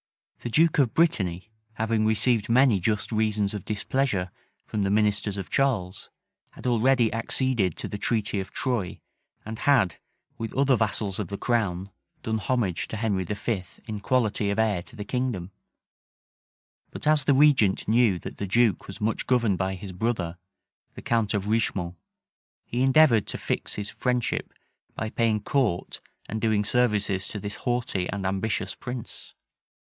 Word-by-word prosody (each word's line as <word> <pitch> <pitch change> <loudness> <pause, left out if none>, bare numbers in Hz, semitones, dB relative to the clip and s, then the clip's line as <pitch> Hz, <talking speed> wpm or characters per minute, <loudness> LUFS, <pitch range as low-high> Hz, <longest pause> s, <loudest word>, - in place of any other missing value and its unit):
The 120 - -5
duke 160 +5 +3
of 130 -5 +2
Brittany, 105 - +1 0.2
having 110 0 0
received 110 +1 +1
many 120 -3 +5
just 105 +4 -1
reasons 110 -2 +1
of 105 -3 -5
displeasure 105 -3 -1 0.3
from 105 - -3
the 100 - +1
ministers 105 -1 +1
of 95 -3 -6
Charles, 105 -9 0 0.4
had - - -13
already 120 -1 +3
acceded 115 - 0
to - - -5
the 105 - -6
treaty 105 -3 0
of 95 0 -5
Troye, 120 -9 -2 0.4
and 110 +1 -6
had, 125 -11 +3 0.4
with 115 -1 -3
other 135 0 +4
vassals 105 -3 -1
of 105 - -2
the 100 - -5
crown, 100 -6 -1 0.3
done 110 0 -1
homage 110 -8 -1
to 110 - -5
Henry 105 -4 0
V. 100 +1 -2 0.2
in 110 -2 -5
quality 105 -2 +1
of 100 - -1
heir 110 -5 +2
to 120 - -14
the 105 -3 -6
kingdom: 115 -7 -2 1.4
but - - -8
as 150 -2 +4
the 140 - +4
regent 130 -9 +4
knew 110 -4 +4
that - - -8
the 100 - -3
duke 115 -1 +2
was 95 - -9
much 110 +1 -1
governed 115 -7 +2
by 95 0 -1
his 95 +1 -8
brother, 90 -3 -2 0.6
the - - -9
count 115 -2 +1
of 100 -1 -1
Richemont, 100 -5 0 0.7
he 120 - -2
endeavored 130 -4 +5
to - - -4
fix - - -2
his 105 0 -4
friendship, 125 -2 -1 0.4
by 110 0 -3
paying 110 -2 +1
court 120 -11 0 0.3
and 110 0 -4
doing 110 -2 +2
services 105 -5 +1
to 105 - -5
this 100 +1 -5
haughty 120 -7 -1
and 100 0 -3
ambitious 95 +2 -1
prince. 120 -1 -8
110 Hz, 160 wpm, -26 LUFS, 100-120 Hz, 1.4 s, many